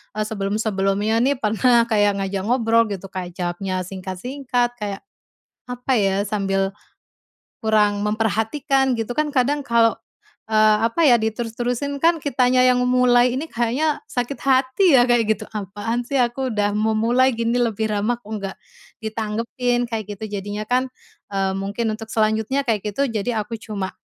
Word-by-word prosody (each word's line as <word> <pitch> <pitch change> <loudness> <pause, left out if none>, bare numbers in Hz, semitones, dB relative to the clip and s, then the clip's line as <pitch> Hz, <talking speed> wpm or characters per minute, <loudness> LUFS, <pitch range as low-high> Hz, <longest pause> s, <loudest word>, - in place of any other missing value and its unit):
eee, 215 - 0
sebelum-sebelumnya 210 0 0
nih, 275 +4 +2
pernah 235 +1 +3
kayak 205 -2 +3
ngajak 195 0 -3
ngobrol 230 -1 +3
gitu, 195 -2 -6
kayak 180 -2 -6
jawabnya 185 +1 -3
singkat-singkat, 240 +7 -3
kayak, 205 -2 -4 0.7
apa 250 +2 -2
ya, 195 -4 +2
sambil 195 -2 -1 0.8
kurang 210 -2 +2
memperhatikan, 225 +6 +1
gitu 235 +2 -3
kan. 300 -1 0
Kadang 280 +2 +1
kalau, 230 -2 +3 0.5
eee, 215 -1 +4
apa 230 +9 -2
ya, 245 -4 +6
diterus-terusin 240 +5 -2
kan 330 +2 +2
kitanya 255 -2 +2
yang 255 0 +4
memulai 250 -1 +4
ini 295 +5 -4
kayaknya 255 +6 0
sakit 245 +3 -3
hati 270 +6 +3
ya 245 0 +4
kayak 230 -3 +3
gitu. 215 - -10
Apaan 210 +3 -4
sih, 270 +1 +1
aku 245 +1 -1
udah 205 -1 0
memulai 225 +4 +2
gini 230 +1 0
lebih 225 -3 0
ramah, 215 +3 -1
kok 210 - -15
nggak 195 -1 -6 0.4
ditanggepin, 230 +3 -2
kayak 215 -3 -4
gitu. 215 +2 -6
Jadinya 205 +1 -4
kan, 255 +1 +1 0.4
e 195 - -3 0.2
mungkin 200 +4 -2
untuk 225 0 -9
selanjutnya 220 +5 +1
kayak 220 -5 -1
gitu, 275 +5 0
jadi 220 0 -1
aku 225 +2 -6
cuma 205 -3 -5
225 Hz, 150 wpm, -21 LUFS, 210-250 Hz, 0.8 s, ya